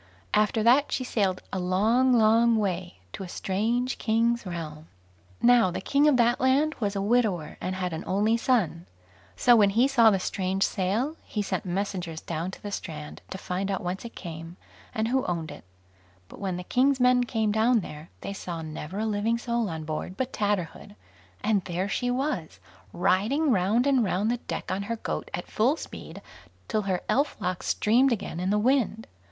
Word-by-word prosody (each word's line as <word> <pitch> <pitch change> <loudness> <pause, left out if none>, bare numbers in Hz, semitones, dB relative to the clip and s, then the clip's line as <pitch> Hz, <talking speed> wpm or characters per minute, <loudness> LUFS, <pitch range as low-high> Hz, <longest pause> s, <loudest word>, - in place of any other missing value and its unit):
After 215 +1 +2
that 260 +6 +4
she 255 - -1
sailed 195 -7 0
a 190 - -1
long, 215 +8 +2
long 230 0 +5
way, 185 -4 -2 0.2
to - - -7
a 185 - -6
strange 230 +8 -1
king's 230 -1 +1
realm. 160 -3 -6 0.6
Now 240 -4 +6
the 175 - -4
king 285 +2 +2
of 290 -4 +4
that 240 0 +3
land 275 +4 +3
was 205 -3 -1
a 195 - -1
widower, 205 -8 +1
and 185 - -2
had 180 -2 -3
an 160 - -4
only 210 +4 +2
son. 215 - 0 0.5
So 245 - +5
when 205 -3 +5
he 235 +6 +3
saw 240 -5 +5
the 200 - +2
strange 190 +1 -1
sail, 220 - -1
he 210 - -3
sent - - -3
messengers 180 -3 -3
down 165 +2 -4
to 190 - -11
the 205 - -5
strand 75 - -6
to - - -5
find 190 +1 -3
out 195 - -2
whence 180 +2 -3
it 235 - -9
came, 165 0 -8 0.3
and 220 +1 -1
who 265 +1 +1
owned 170 -3 -3
it; - - -11 0.6
but - - -13
when 190 -3 -2
the 180 - -5
king's 260 +6 +2
men 250 0 +4
came 220 -3 0
down 220 +2 +3
there, 150 -1 -9
they 200 - -5
saw 170 -4 -6
never 155 +3 -6
a 220 - -1
living 220 +2 0
soul 235 -2 -1
on 160 -1 -5
board 155 +4 -5
but 260 0 -2
Tatterhood, 205 -1 -2 0.5
and 205 -3 +2
there 180 +2 -2
she 245 +4 -1
was, 250 - -2 0.3
riding 230 - +2
round 210 +4 +2
and 270 -4 +3
round 205 +3 0
the 245 - 0
deck 235 - -5
on 190 +1 -1
her 220 +3 -3
goat 225 - -4
at - - -6
full 255 +9 +1
speed, - - -9 0.4
till 215 - 0
her 190 -3 -1
elf 280 -2 +1
locks 180 -2 -3
streamed 250 +5 +3
again 200 -6 -3
in 180 +1 -1
the 205 - +2
wind. 225 -1 +1
210 Hz, 190 wpm, -27 LUFS, 185-240 Hz, 0.6 s, Now